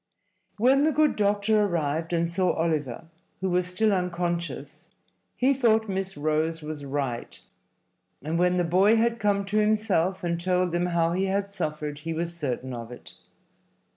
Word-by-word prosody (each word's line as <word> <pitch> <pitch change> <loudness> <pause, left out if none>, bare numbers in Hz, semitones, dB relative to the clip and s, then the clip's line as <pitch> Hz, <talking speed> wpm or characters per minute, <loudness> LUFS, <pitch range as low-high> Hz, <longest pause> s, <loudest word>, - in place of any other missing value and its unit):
When 260 +6 +4
the 315 - +3
good 305 0 +2
doctor 210 +1 +2
arrived 165 -3 -1
and 170 -1 +1
saw 180 +1 +1
Oliver, 155 -4 -2 0.3
who 190 -1 -1
was 180 0 +1
still 205 +4 +1
unconscious, 170 -4 -3 0.5
he 265 +2 +3
thought 225 -4 +2
Miss 190 -2 -3
Rose 155 +2 0
was 150 -1 -6
right, 135 -4 -4 0.8
and 160 +3 -1
when 180 0 +3
the 175 - +2
boy 190 +6 +4
had 230 +1 +1
come 200 -1 +1
to 210 +2 0
himself 210 -4 +1
and 170 -1 -1
told 180 0 +1
them 175 +1 0
how 170 -1 +1
he 190 +2 0
had 200 +1 -1
suffered, 150 -5 -3
he 165 +2 -4
was 170 +1 -3
certain 130 -5 -3
of 115 0 -7
it. 125 - -11
175 Hz, 165 wpm, -26 LUFS, 160-200 Hz, 0.8 s, When